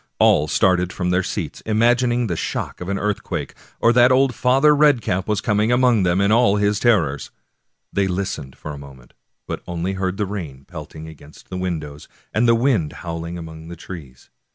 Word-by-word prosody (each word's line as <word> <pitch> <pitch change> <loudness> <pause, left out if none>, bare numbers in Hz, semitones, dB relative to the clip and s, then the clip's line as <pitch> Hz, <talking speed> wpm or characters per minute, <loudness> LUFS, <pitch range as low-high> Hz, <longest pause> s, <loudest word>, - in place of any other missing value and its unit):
All 75 - +4
started 90 +2 +2
from 90 -1 -2
their 90 +1 +2
seats, - - -5
imagining 120 +2 +2
it 115 - -3
the 85 - -1
shock - - -4
of 90 - -5
an 100 - -1
earthquake, 105 0 -3 0.3
or 115 - +4
that 125 +1 +5
old 130 0 +3
Father 135 +5 +4
Red 145 -3 +4
cap 95 -3 -2
was 105 -2 0
coming 105 +2 +1
among 125 -3 +3
them 90 0 +2
in 100 +1 +2
all 110 -3 +4
his 105 0 +1
terrors. 85 - +1 0.6
They 100 -1 +1
listened 90 -8 -4
for 75 - -7
a 70 - -8
moment, 65 -3 -14 0.3
but - - -4
only 85 +2 -3
heard 95 0 -2
the 105 - 0
rain 80 -10 -7
pelting 80 -1 -9
against 75 -1 -15
the 90 - -4
windows 80 -5 -5 0.3
and 115 +2 +2
the 115 - +5
wind 115 - +1
howling 85 +1 -5
among 80 -1 -9
the 85 - -8
trees. 75 -8 -11
95 Hz, 195 wpm, -21 LUFS, 80-115 Hz, 0.6 s, that